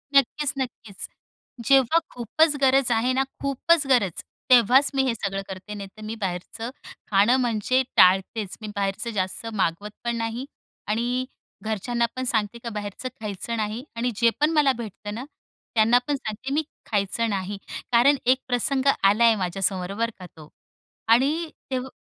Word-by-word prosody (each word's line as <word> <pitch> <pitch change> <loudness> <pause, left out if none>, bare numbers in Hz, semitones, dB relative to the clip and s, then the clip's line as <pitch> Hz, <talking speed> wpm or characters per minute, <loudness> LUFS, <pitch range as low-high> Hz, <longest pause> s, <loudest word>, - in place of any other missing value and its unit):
नक्कीच-नक्कीच. 265 -6 0 0.6
जेव्हा 270 +5 +5
खूपच 290 +6 +1
गरज 270 -1 +4
आहे 235 +3 +2
ना, 265 +1 +2 0.2
खूपच 280 +3 +2
गरज, 235 -10 +2 0.3
तेव्हाच 255 +3 +6
मी 270 - +3
हे 245 - +1
सगळं 195 -3 -3
करते, 190 +2 -7
नाही 200 -1 -7
तर 215 - -11
मी 215 +1 -4
बाहेरचं 190 +5 -4 0.4
खाणं 205 +5 +5
म्हणजे 245 +2 +1
टाळतेच. 190 +2 +4
मी 215 - -6
बाहेरचं 200 +4 -1
जास्त 190 +4 -2
मागवत 195 +1 -1
पण 235 0 -1
नाही 230 +2 -3 0.4
आणि 240 +4 0 0.4
घरच्यांना 225 +3 -1
पण 255 - -2
सांगते, 220 -2 0
का 235 - -7
बाहेरचं 205 +4 -5
खायचं 215 +2 -4
नाही 220 +3 -3
आणि 240 +2 0
जे 235 +2 +4
पण 300 +1 +4
मला 300 -4 +4
भेटतं 210 -2 -7
ना, 240 +4 -5 0.5
त्यांना 230 +2 +5
पण 290 - 0
सांगते 255 +2 -5
मी 310 - +2 0.3
खायचं 210 +2 0
नाही. 200 0 -3 0.3
कारण 245 +5 +5
एक 255 +1 +5
प्रसंग 260 +2 0 0.2
आलाय 220 +4 +5
माझ्यासमोर 185 0 -1
बरं 230 +2 0
का 180 - -9
तो, 155 -2 -13 0.6
आणि 290 +8 +3 0.2
तेव्ह 260 0 -2
230 Hz, 155 wpm, -24 LUFS, 205-255 Hz, 0.6 s, तेव्हाच